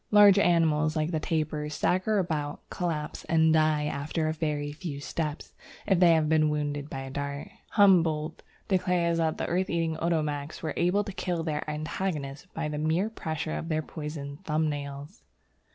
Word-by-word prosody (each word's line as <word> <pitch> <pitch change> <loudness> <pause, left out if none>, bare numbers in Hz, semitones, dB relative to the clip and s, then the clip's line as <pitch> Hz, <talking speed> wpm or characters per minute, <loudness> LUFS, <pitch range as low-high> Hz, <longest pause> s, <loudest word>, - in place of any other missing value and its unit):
Large 205 -2 +7
animals 160 -4 +3
like 155 +1 0
the 160 - 0
tapir 155 -2 -1
stagger 185 +7 +1
about, 155 -6 -2
collapse, 165 -5 -3
and 160 -1 +4
die 155 -1 +3
after 150 +2 -2
a 155 - 0
very 150 -2 -2
few 150 -2 -6
steps, 150 +1 -4 0.3
if 190 -4 +3
they 175 -2 +7
have 155 -1 +2
been 155 -1 +3
wounded 145 -1 -2
by 135 - -5
a 135 0 -7
dart. 140 +1 -4 0.2
Humboldt 165 -6 +4 0.3
declares 180 -3 +1
that 160 -1 +1
the - - -2
earth 185 +2 0
eating 165 -1 0
Otomaks 155 -3 -2
were 155 - -2
able 180 +4 +2
to 200 - -6
kill 180 -3 -2
their 155 -1 -2
antagonists 150 0 -3
by 160 -1 -2
the 150 -1 -3
mere 165 +8 +1
pressure 155 -6 -3
of 165 - -4
their 155 -1 0
poisoned 150 0 -7
thumbnails. 150 0 -3
155 Hz, 170 wpm, -28 LUFS, 150-170 Hz, 0.3 s, Large